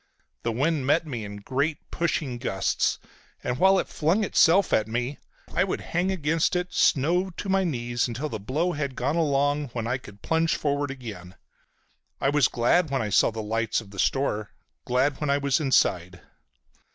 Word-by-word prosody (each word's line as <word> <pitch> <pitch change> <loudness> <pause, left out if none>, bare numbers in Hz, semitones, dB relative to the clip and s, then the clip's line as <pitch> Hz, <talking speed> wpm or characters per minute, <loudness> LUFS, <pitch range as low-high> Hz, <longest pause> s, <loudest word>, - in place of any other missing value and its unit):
The 115 - -1
wind 140 +3 0
met 160 +4 +3
me 125 -7 -5
in 100 0 -7
great 140 +7 -2
pushing 150 -7 -1
gusts, 95 -6 0 0.5
and 125 +1 -2
while 190 +1 +5
it - - 0
flung 170 +8 +1
itself 190 -1 +4
at 110 - +2
me 120 +5 -3 0.3
I 180 - +3
would 190 - -2
hang 175 +3 +1
against 165 -1 0
it, 180 0 -2
snow 175 +6 +2
to 190 +2 -7
my 195 0 +3
knees, 120 -7 -1
until 125 +6 -3
the 110 -7 -5
blow 150 - -1
had 140 -4 -3
gone 135 +5 -1
along, 145 -2 +1
when 115 -2 -3
I 125 +3 -1
could 105 -5 -14
plunge 165 0 +1
forward 145 -1 -1
again. 105 -9 -8 0.8
I 135 - +2
was 145 -2 +4
glad 150 +8 +2
when 135 -3 0
I 105 - -3
saw - - +4
the 110 -1 -5
lights 115 +1 0
of 105 -3 -12
the 100 - -9
store, 110 -6 0 0.4
glad 130 +4 +1
when 150 - -1
I 140 - +3
was 140 -2 +1
inside. 90 - +1
140 Hz, 185 wpm, -26 LUFS, 120-160 Hz, 0.8 s, while